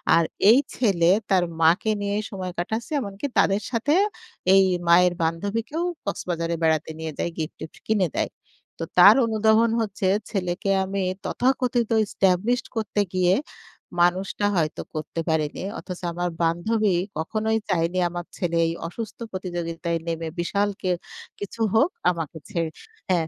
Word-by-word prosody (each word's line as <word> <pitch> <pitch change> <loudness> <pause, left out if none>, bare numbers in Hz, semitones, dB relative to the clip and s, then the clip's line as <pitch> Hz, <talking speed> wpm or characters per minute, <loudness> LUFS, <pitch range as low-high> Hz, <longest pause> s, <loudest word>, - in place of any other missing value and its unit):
আর 170 - +4 0.3
এই 245 - +7 0.2
ছেলে 185 -8 +3 0.2
তার 190 -3 +4 0.2
মাকে 170 +7 +4
নিয়ে 200 0 -1 0.2
সময় 185 -3 -4
কাটাচ্ছে, 220 - -3
এমনকি 200 +3 -4
তাদের 195 +1 +3
সাথে 235 +5 +1 0.6
এই 195 - +7 0.2
মায়ের 175 +1 +6
বান্ধবীকেও 205 - -2 0.2
কক্সবাজারে 170 -4 -2
বেড়াতে 160 -1 +1
নিয়ে 160 0 -4
যায়, - - -1
গিফট-টিফট 155 0 -6
কিনে 210 -4 +2
দেয়। - - -1 0.5
তো - - -2
তার 200 +4 +9
অনুধাবন 220 +1 +3
হচ্ছে, 200 -3 -2 0.2
"ছেলেকে 185 0 -1
আমি 195 0 -2 0.2
তথাকথিত 250 -2 +1 0.2
এস্টাবলিশড 205 +6 +1
করতে 215 -2 0
গিয়ে, 185 0 +4 0.7
মানুষটা 190 +3 +1
হয়তো 155 -1 0
করতে 155 +2 -3
পারিনি। 155 0 -1 0.2
অথচ 180 -2 -7
আমার 175 +1 -1
বান্ধবী 190 +5 +1 0.2
কখনোই 220 +6 0
চায়নি 175 0 +1
আমার 175 0 -5
ছেলে 170 -2 -1
এই 165 - -1
অসুস্থ 215 +5 -7
প্রতিযোগিতায় 170 -2 -3
নেমে, 165 0 -2
বিশাল 200 +4 +1
কে 185 - 0 0.5
কিছু 205 +3 -6
হোক 275 +9 +5 0.2
আমাকে 165 -2 -5
ছেড়ে" 170 -6 -2 0.4
হ্যাঁ, 170 -3 +2
185 Hz, 135 wpm, -24 LUFS, 170-215 Hz, 0.7 s, তার